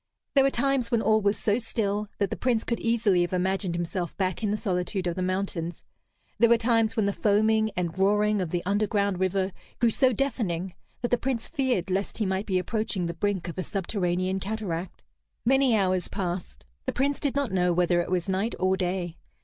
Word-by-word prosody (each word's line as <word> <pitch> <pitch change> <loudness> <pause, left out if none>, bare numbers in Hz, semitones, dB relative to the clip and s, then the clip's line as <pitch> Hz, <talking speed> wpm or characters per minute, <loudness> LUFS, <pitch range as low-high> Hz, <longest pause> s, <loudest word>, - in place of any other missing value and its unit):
There 275 - +5
were 275 - +4
times 270 -1 +1
when 230 -2 +1
all 215 +1 +4
was 200 0 +2
so 210 +2 +1
still 210 -3 -2
that 200 - 0
the - - -1
Prince 240 -3 +1
could 235 - -2
easily 225 -6 +2
have 175 +1 -1
imagined 185 -1 0
himself 175 0 -3
back 185 -3 -1
in 215 - 0
the 210 - 0
solitude 185 -2 -1
of 175 -1 -1
the 185 - -3
mountains; 185 -3 -2 0.6
there 235 - +6
were 235 - +6
times 225 -1 +2
when 220 -4 +2
the 200 - +1
foaming 220 +2 +3
and 170 -2 -1
roaring 210 +1 +3
of 180 - -2
the 175 +1 -2
underground 200 -1 +1
river 190 +1 +1 0.3
grew 235 -1 +3
so 260 +3 +3
deafening 200 -9 -1 0.3
that 240 - -1
the 245 - +3
Prince 250 -3 -2
feared 255 - -1
lest 195 +2 -1
he 215 - 0
might 190 +2 -1
be 190 -2 +1
approaching 195 0 -1
the 170 - -2
brink 190 0 -1
of 170 +2 -5
a - - -1
subterranean 185 -1 -1
cataract. 190 -4 -4 0.4
Many 265 -1 +4
hours 185 -3 +1
passed. 175 - -4 0.2
The - - 0
Prince 280 +2 0
did 280 -2 -1
not 280 -6 0
know 180 -1 +2
whether 175 0 +2
it - - -5
was 180 -1 0
night 195 +4 0
or 185 +1 +2
day. 180 -2 -2
200 Hz, 205 wpm, -27 LUFS, 180-225 Hz, 0.6 s, there